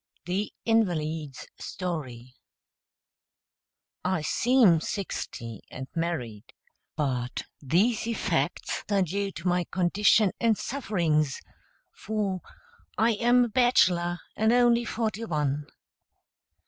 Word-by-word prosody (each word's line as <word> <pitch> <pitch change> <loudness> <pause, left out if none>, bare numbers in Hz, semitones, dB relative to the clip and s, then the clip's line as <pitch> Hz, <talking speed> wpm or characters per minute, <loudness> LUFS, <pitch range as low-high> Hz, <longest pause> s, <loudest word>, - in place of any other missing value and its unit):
THE 190 +4 -2
INVALID'S 160 - 0
STORY 130 -9 -5 1.7
I 185 -3 0
seem 230 -5 +4
sixty 120 - -5
and 130 +1 -7
married, 135 -9 -4 0.4
but 125 -5 -2 0.2
these 195 - +2
effects 230 - -1
are 200 -2 +3
due 195 +3 -2
to 170 - -5
my 180 0 +2
condition 200 +3 +3
and 225 -3 +3
sufferings, 165 - 0 0.5
for 200 -3 -2 0.6
I 225 +2 +4
am 240 +3 +4
a - - -5
bachelor, 185 -8 +3 0.2
and 220 +1 +2
only 240 -1 +4
forty 225 -1 -2
one. 150 -5 -1
180 Hz, 95 wpm, -27 LUFS, 150-220 Hz, 1.7 s, seem